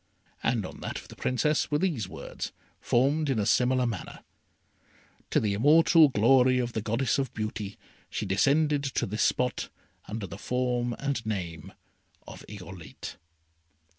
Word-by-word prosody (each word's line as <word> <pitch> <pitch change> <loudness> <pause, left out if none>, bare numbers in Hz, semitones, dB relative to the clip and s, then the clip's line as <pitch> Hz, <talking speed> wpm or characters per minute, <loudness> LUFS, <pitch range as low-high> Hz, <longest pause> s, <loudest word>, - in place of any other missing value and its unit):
And 115 -4 0
on - - -9
that - - -4
of - - -10
the - - -11
Princess 150 +4 +1
were 150 - +2
these 150 - -1
words, 80 - -6 0.3
formed 140 +5 +2
in 135 - +1
a 105 - +1
similar 125 +3 +3
manner: 115 -6 -5 1.1
"To - - +3
the 105 -2 0
immortal 155 - +6
glory 130 +2 +4
Of 120 -1 -1
the 110 - -1
Goddess 115 +5 0
of 135 -4 -1
Beauty. 110 -2 -4 0.3
She 105 - -3
descended 140 +9 +2
to 135 - -1
this 105 +3 -3
spot 125 0 +1 0.4
Under 110 -1 -4
the 100 +1 -9
form 125 0 -1
and 140 -4 -2
name 90 -5 -4 0.6
of - - -10
Irolite." 90 -4 -9
120 Hz, 150 wpm, -28 LUFS, 105-135 Hz, 1.1 s, immortal